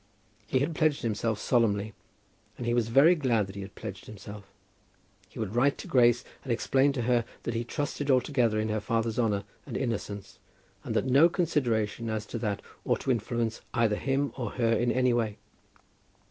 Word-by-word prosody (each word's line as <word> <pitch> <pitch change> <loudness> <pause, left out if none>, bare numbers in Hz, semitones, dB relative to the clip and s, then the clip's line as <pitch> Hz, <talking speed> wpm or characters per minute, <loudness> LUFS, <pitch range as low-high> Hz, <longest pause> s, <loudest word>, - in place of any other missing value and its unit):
He 130 - +1
had 140 +5 0
pledged 155 -2 +1
himself 110 -1 -1
solemnly, 110 -3 +1 0.6
and 120 - -5
he 120 - +1
was 120 -2 +2
very 135 +9 +6
glad 125 - +1
that 95 - -10
he 100 - -5
had 95 +1 -9
pledged 100 -3 -8
himself. 100 -1 -10 0.8
He - - -15
would 110 -2 -3
write 135 +3 +3
to - - -8
Grace 120 -1 +4 0.2
and 130 - -4
explain 135 +4 +2
to 125 -4 -2
her 120 0 +2 0.2
that 120 - -2
he 115 +1 -1
trusted 145 +3 -3
altogether 125 -4 +2
in 110 +1 -1
her 110 0 0
father's 115 +1 -1
honour 105 -4 +1 0.2
and - - -4
innocence, 105 -5 -4 0.4
but - - -4
that - - +2
no 140 +6 +6
consideration 120 - 0
as 110 -1 -2
to 115 - -5
that 105 -3 -2 0.2
ought - - 0
to 135 - 0
influence 115 0 -1
either 115 -3 +3
him 135 +4 -1
or 120 -5 -4
her 115 -2 +2
in 120 +2 +2
any 125 -1 +2
way. 110 -3 0
115 Hz, 190 wpm, -28 LUFS, 110-130 Hz, 0.8 s, very